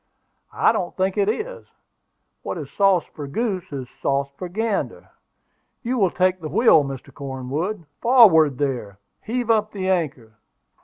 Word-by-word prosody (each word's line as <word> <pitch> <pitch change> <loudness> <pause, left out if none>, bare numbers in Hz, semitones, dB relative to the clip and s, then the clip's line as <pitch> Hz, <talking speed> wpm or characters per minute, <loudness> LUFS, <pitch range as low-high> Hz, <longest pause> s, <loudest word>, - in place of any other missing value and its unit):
"I - - +4
don't 190 -6 -3
think 190 0 0
it 205 -1 +2
is: 475 - -4 0.7
what - - -5
is 145 -4 -7
sauce 195 0 +3
for 145 -2 -7
goose 190 - -3
is 135 -3 -5
sauce 140 0 0
for 180 - -5
gander. 215 +2 -3 0.7
You 250 +1 -1
will 195 -3 +4
take 185 0 +1
the 155 - -5
wheel, 160 - +5
Mr. 135 -2 -7
Cornwood. 140 +8 -4 0.2
Forward, 185 - +6
there! 125 -9 -3 0.2
Heave 240 0 -1
up 215 -1 +1
the 190 -2 -3
anchor." 130 - -2
180 Hz, 150 wpm, -22 LUFS, 140-215 Hz, 0.7 s, Forward